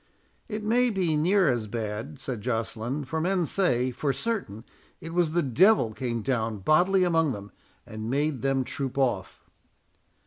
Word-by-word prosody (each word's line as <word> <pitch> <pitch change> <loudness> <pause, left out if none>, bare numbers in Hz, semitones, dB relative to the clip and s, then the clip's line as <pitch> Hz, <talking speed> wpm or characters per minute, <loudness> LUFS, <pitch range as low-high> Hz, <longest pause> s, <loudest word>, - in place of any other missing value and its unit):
"It 215 -1 -4
may 245 +3 +3
be 185 -7 0
near 180 +4 +3
as 120 -5 0
bad," 115 +6 -5
said 130 -5 -4
Joceline, 115 +4 -2
"for 160 +3 -2
men 180 0 +1
say, 130 -9 +1
for 140 +3 -1
certain, 135 - -3 0.4
it 165 +1 -8
was 170 -3 +1
the 175 - +2
Devil 145 - +4
came 115 -2 -3
down 115 -4 -1
bodily 180 - +3
among 165 -5 +2
them, 100 -1 -9 0.3
and 110 +1 -6
made 140 0 0
them 135 -1 +1
troop 135 +1 -5
off." 120 -9 -1
135 Hz, 160 wpm, -27 LUFS, 115-175 Hz, 0.4 s, Devil